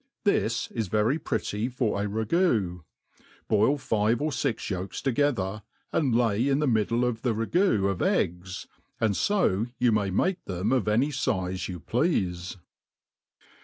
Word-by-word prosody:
This 115 - +1
is 115 -4 -2
very 110 - +1
pretty 105 -4 -2
for 120 -5 -1
a 105 - -1
ragoo, 110 - +1 0.7
boil 110 +7 +3
fi?e 110 -4 +1
or 150 +6 -1
ux 130 -5 -2
yolks 95 0 -4
together, 120 -7 0 0.3
and 135 -7 +2
lay 115 0 +2
in 135 -1 +2
the 150 - +1
middle 115 0 +2
of 115 -2 -2
the 120 -4 0
ragoo 115 - +2
of 100 -2 -2
eggs; 90 +2 -1 0.3
and 110 -3 +1
fo 120 - +1
you 125 -1 +3
may 105 -2 +1
make 180 - 0
them 95 +4 -2
of 130 -6 +1
any 120 +7 +3
fize 95 -9 -1
you 90 -1 -5
pleafe. 95 - -1
110 Hz, 150 wpm, -27 LUFS, 100-130 Hz, 0.7 s, boil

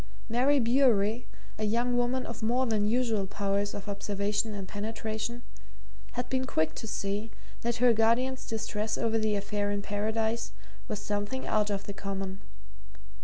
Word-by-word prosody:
Mary 255 +5 +4
Bewery, 235 -2 +3 0.3
a - - -1
young 235 +3 +2
woman 245 +1 +1
of 235 0 -6
more 245 +4 +2
than 215 -3 +2
usual 225 -4 +2
powers 200 +1 0
of 200 - -6
observation 205 +1 -1
and 195 -2 -5
penetration, 220 +2 -3 0.7
had 245 0 -2
been 260 0 0
quick 160 -8 +1
to 225 - -6
see 205 0 -2 0.3
that 235 0 0
her 245 0 +5
guardian's 235 +4 +2
distress 220 -1 -1
over 225 -1 +2
the 215 -1 +2
affair 205 0 -1
in 205 0 -1
Paradise 220 +3 -1 0.3
was 210 - -2
something 205 +4 -2
out 210 -1 +2
of 200 -1 -1
the 200 - -5
common. 195 -1 -4
220 Hz, 155 wpm, -30 LUFS, 205-235 Hz, 0.7 s, her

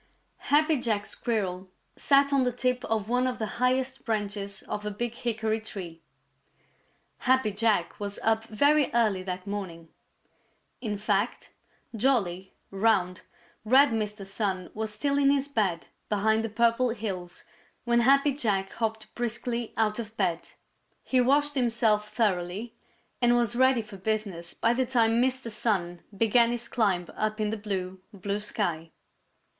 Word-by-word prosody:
_ - - -16
Happy 305 0 +3
Jack 215 -4 0
Squirrel 190 -7 -3 0.3
sat 280 0 +3
on 275 - +4
the 250 -1 +1
tip 250 +1 -1
of 220 -2 -1
one 250 +2 +1
of 250 -1 -2
the 220 - -2 0.2
highest 260 +1 +1
branches 205 -2 -3
of 210 - -5
a 210 - -2
big 230 +3 -3
hickory 220 -2 -1
tree. 175 -6 -8 1.2
Happy 260 -4 +2
Jack 205 -3 0
was 200 -1 -4
up 225 0 +2
very 285 +7 +3
early 215 -5 +2
that 185 0 -5
morning. 185 -5 -6 0.9
In 210 -4 -3
fact, 205 +2 -1 0.4
jolly, 200 -7 0 0.2
round, 195 -3 +1 0.4
red 265 +6 +6
Mr. 210 -2 -3
Sun 195 -2 -3
was 220 0 -3
still 280 +6 0
in 275 -1 +4
his 280 0 +2
bed 205 -11 -1 0.2
behind 220 +2 +2
the 225 - -2
Purple 235 +3 +2
Hills 195 -6 -5 0.4
when 235 0 +2
Happy 275 +3 +4
Jack 200 -8 0
hopped 220 -1 -3
briskly 235 0 -2
out 215 0 +1
of 220 -1 -7
bed. 175 -4 -1 0.5
He 255 -1 +2
washed 290 +3 +3
himself 230 -5 +1
thoroughly 210 0 -1 0.5
and 240 0 +4
was 240 -2 +2
ready 260 -2 +3
for 210 -2 -11
business 190 -4 -3
by 230 - +2
the 255 +1 0
time 235 -2 +3
Mr. 260 -2 0
Sun 195 -6 -1 0.2
began 230 +2 +4
his 240 0 -3
climb 195 -6 +1
up 215 0 -2
in 210 -1 0
the - - -1
blue, 190 -3 -4
blue 200 +1 -3
sky. 175 -6 -2
220 Hz, 150 wpm, -27 LUFS, 200-240 Hz, 1.2 s, red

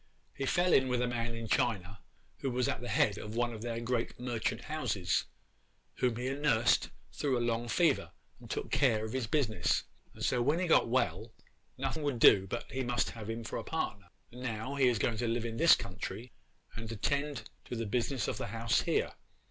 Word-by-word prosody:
He 135 - -3
fell 175 +4 +3
in 130 - +5
with 125 -1 +1
a - - +1
man 120 -1 -2
in 115 -1 -5
China 100 -4 0 0.4
who 135 - -1
was 125 -1 0
at - - -2
the 120 - -5
head 105 -1 +2
of 105 +1 -7
one 120 0 0
of 110 - -7
their 115 0 -3
great 120 0 -2
merchant 120 -2 -2
houses, 100 - -1 0.7
whom 125 -2 +1
he 125 +2 -3
nursed 135 -5 +3 0.2
through 135 -4 0
a - - 0
long 115 0 -1
fever, 155 +3 +2 0.3
and - - -13
took - - -3
care 110 -5 +3
of 110 - -6
his 130 -4 -1
business, 110 - +1 0.3
and - - -3
so 125 - +2
when 145 +7 +2
he 185 - 0
got 165 -8 +4
well 110 -3 0 0.5
nothing 135 +4 -2
would 145 -4 -1
do 95 -4 +7
but 120 - -5
he 130 - -2
must 120 0 0
have 110 -2 -8
him 115 +1 -3
for - - -4
a - - -5
partner, 100 -11 -3 0.2
and 125 +1 -10
now 115 +1 -3
he 135 -2 +3
is 120 -2 +3
going 110 +1 0
to 120 - -1
live 115 0 -1
in 115 -1 -4
this 165 +5 +7
country 110 +5 -6 0.4
and 115 0 -6
attend 140 +1 -1 0.2
to - - -5
the 115 0 -2
business 120 +3 -1
of - - -2
the - - -3
house 115 +2 +1
here. - - 0
120 Hz, 210 wpm, -32 LUFS, 110-130 Hz, 0.7 s, do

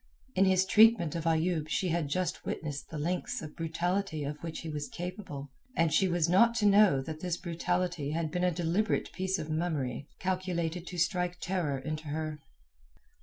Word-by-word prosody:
In 195 - +4
his 190 0 +4
treatment 210 -5 +5
of 165 -1 -3
Ayoub 160 -1 +1
she 185 +3 0
had 165 -2 0
just 180 +4 -1
witnessed 145 -4 -4
the 160 - -6
lengths 175 +5 -2
of 155 - -8
brutality 170 0 -1
of 145 +1 -5
which 165 -1 -5
he 165 - -6
was 150 -1 -4
capable, 170 -6 -6 0.2
and 165 -1 +2
she 195 - +4
was 175 -2 +2
not 230 +7 +5
to 220 -3 +1
know 200 -8 +6
that 155 +2 -6
this 175 0 -2
brutality 170 -2 -1
had 160 0 -1
been 180 +2 -1
a 180 - +4
deliberate 175 +5 0
piece 190 +1 -1
of 155 -3 -5
mummery 150 -5 -2
calculated 180 -2 -2
to 180 - -6
strike 180 0 0
terror 165 -4 -1
into 155 +3 -5
her. 155 0 -3
170 Hz, 180 wpm, -31 LUFS, 155-185 Hz, 0.2 s, know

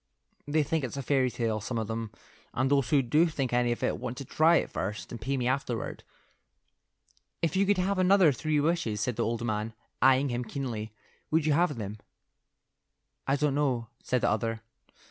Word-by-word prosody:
They 150 +1 +2
think 155 +1 -1
it's 130 +1 -4
a 140 - -3
fairy 130 -1 +2
tale; 115 -3 -2
some 120 +2 -3
of 110 - -1
them, 115 0 -3 0.5
and 130 +2 +1
those 140 -2 +2
who 145 -4 +4
do 150 +8 +3
think 135 -6 -2
anything 120 -1 +2
of - - -8
it - - 0
want 125 -1 -4
to 140 - -6
try 160 +6 +4
it - - +1
first 105 +3 -4
and 120 - -7
pay 135 +4 -1
me 125 -1 0
afterward." 125 -3 -2 1.4
"If 165 - +1
you 195 +1 +3
could 205 -1 +3
have 185 +1 0
another 185 -3 +5
three 155 +2 0
wishes," 145 -9 0
said 125 +2 -1
the - - 0
old 115 +1 -2
man, 110 0 -2 0.3
eyeing 135 +1 +5
him 120 0 -2
keenly, 110 -3 -4 0.4
"would 160 -1 +2
you 155 - +3
have 165 -1 +2
them?" 105 -1 -5 1.3
"I 135 - +3
don't 145 0 +1
know," 130 -6 0
said 125 -1 0
the - - +2
other. 115 +1 -1
130 Hz, 200 wpm, -29 LUFS, 115-150 Hz, 1.4 s, another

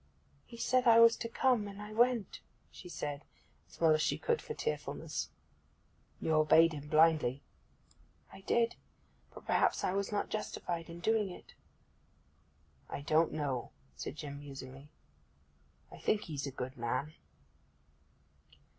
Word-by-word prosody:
'He 235 - -11
said 255 +1 +2
I 230 0 +8
was 230 0 +8
to 230 - -4
come, 240 -3 +2
and 200 0 -9
I 210 +1 -8
went,' 235 -2 +2 0.3
she 180 - -11
said, 145 -3 -4 0.5
as - - -17
well 160 -2 +5
as 155 - +2
she 155 - +1
could 470 -1 0
for 450 - -6
tearfulness. 465 - -3 0.9
'You 160 - 0
obeyed 160 +2 +5
him 145 -1 -7
blindly.' 155 -4 +3 0.9
'I - - -11
did. 235 +4 +1 0.6
But - - -13
perhaps - - +2
I 180 - +1
was 200 +1 -1
not 205 - -1
justified 175 -5 -4
in 170 +1 -9
doing 220 0 +2
it.' 180 - -12 1.4
'I - - -5
don't 155 +3 +2
know,' 145 -5 -2 0.3
said - - -6
Jim 145 -2 -7
musingly. 135 0 -10 1.0
'I - - -11
think 215 - +1
he's 145 -4 -4
a - - -4
good 130 0 -6
man. 125 +6 -2
165 Hz, 145 wpm, -33 LUFS, 145-215 Hz, 1.4 s, I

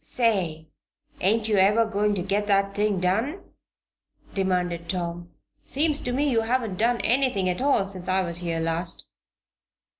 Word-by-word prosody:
"Say! 180 -10 -1 0.5
ain't 215 +4 +2
you 215 -2 +2
ever 210 +4 +4
going 210 -1 0
to 180 - -2
get 200 +2 -1
that 200 -1 +2
thing 205 -2 0
done?" 225 - 0 0.9
demanded 180 -3 -1
Tom. 175 -1 -4 0.3
"Seems 300 +1 0
to 245 - -3
me 280 +4 +1
you 235 -5 +2
haven't 225 -4 -1
done 235 +2 +2
anything 245 -6 +1
at 180 +6 -1
all 275 -8 +3
since 185 -2 -5
I 190 +1 +2
was 170 -2 -3
here 170 -2 -2
last." 165 +1 -1
200 Hz, 155 wpm, -25 LUFS, 180-230 Hz, 0.9 s, ever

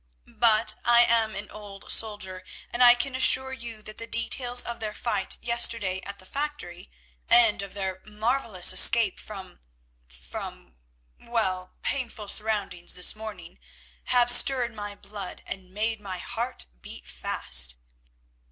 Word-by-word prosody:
But 225 -1 +3
I 240 0 +5
am 225 -2 +1
an - - -6
old 205 -2 -8
soldier, 200 -4 -2 0.3
and 245 +1 +1
I 240 0 +8
can 260 +2 -1
assure 260 0 +5
you 230 -4 -9
that 215 - -9
the 230 - -7
details 245 +1 +1
of 235 - -7
their 215 -1 -5
fight 210 -5 -2
yesterday 230 -5 +1
at 200 0 -7
the 185 - -14
factory, 280 - -6 0.4
and 230 -4 +4
of 200 0 -8
their 190 -2 -4
marvellous 215 -3 0
escape 220 +1 +5
from—from—well, - - -8
painful 235 -6 -4
surroundings 210 -5 -1
this 180 - +2
morning, 205 -6 -10 0.5
have 245 -1 +4
stirred 245 -1 +7
my 205 -1 -7
blood 200 -2 -8
and 190 -2 -8
made 215 +3 -3
my 190 -3 -5
heart 235 +6 -5 0.2
beat - - -12
fast." - - 0
210 Hz, 135 wpm, -26 LUFS, 185-235 Hz, 0.5 s, I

